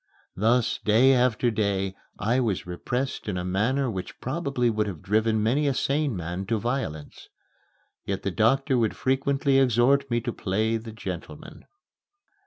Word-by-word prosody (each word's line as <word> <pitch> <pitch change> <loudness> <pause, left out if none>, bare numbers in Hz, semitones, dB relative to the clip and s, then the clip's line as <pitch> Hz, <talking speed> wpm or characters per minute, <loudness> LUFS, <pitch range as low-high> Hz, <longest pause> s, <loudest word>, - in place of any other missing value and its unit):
Thus, 115 +4 +2
day 120 +5 +5
after 125 -1 +2
day, 100 -3 -1 0.2
I 115 +5 +1
was 110 -7 -1
repressed 125 +11 -3
in 95 -3 -2
a 90 - -3
manner 115 +9 +1
which 95 -6 -5
probably 135 -3 -1
would 110 -2 0
have 90 -7 -7
driven 110 +1 +1
many 140 +7 +2
a 135 - +1
sane 140 -3 0
man 90 +2 -4
to 115 0 +1
violence. 110 - -4 0.7
Yet 100 -1 -3
the 100 - -1
doctor 130 +6 +2
would 110 -2 0
frequently 135 +1 +1
exhort 135 +2 +3
me 120 -1 +1
to 120 0 -3
play 110 +4 0
the 110 0 -8
gentleman. 110 - -8
115 Hz, 155 wpm, -26 LUFS, 100-130 Hz, 0.7 s, day